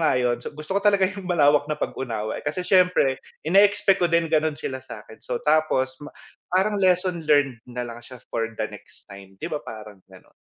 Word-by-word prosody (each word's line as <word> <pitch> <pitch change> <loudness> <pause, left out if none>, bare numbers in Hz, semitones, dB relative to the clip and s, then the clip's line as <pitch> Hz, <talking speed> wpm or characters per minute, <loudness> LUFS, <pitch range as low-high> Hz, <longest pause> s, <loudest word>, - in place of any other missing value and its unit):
nga 155 -5 +3
'yon 125 -1 0 0.2
gusto 155 +3 -6
ko 200 - +1
talaga 200 -2 +4
yung 190 -1 -4
malawak 145 -3 +3
na 150 - -1
pag-unawa, 110 -7 -4
eh, - - -20
kasi 155 +5 -2
siyempre 180 -8 +3 0.2
ineexpect 195 +3 +4
ko 175 - +3
din 170 -1 +1
gano'n 155 -1 +2
sila 130 -2 -5
sa'kin. 110 -2 -12
So. 125 - -4
tapos 140 -4 +1 0.5
parang 195 +3 +1
lesson 180 -1 +2
learned 140 -5 +3
nalang 120 -1 -6
siya 120 +2 -11 0.2
for 115 -1 -1
the 115 - -4
next - - -13
time 95 -1 -13
'di 165 - -6
ba, 150 - -2
parang 105 -3 -10
gano'n. 95 -1 -18
150 Hz, 190 wpm, -24 LUFS, 120-180 Hz, 0.5 s, talaga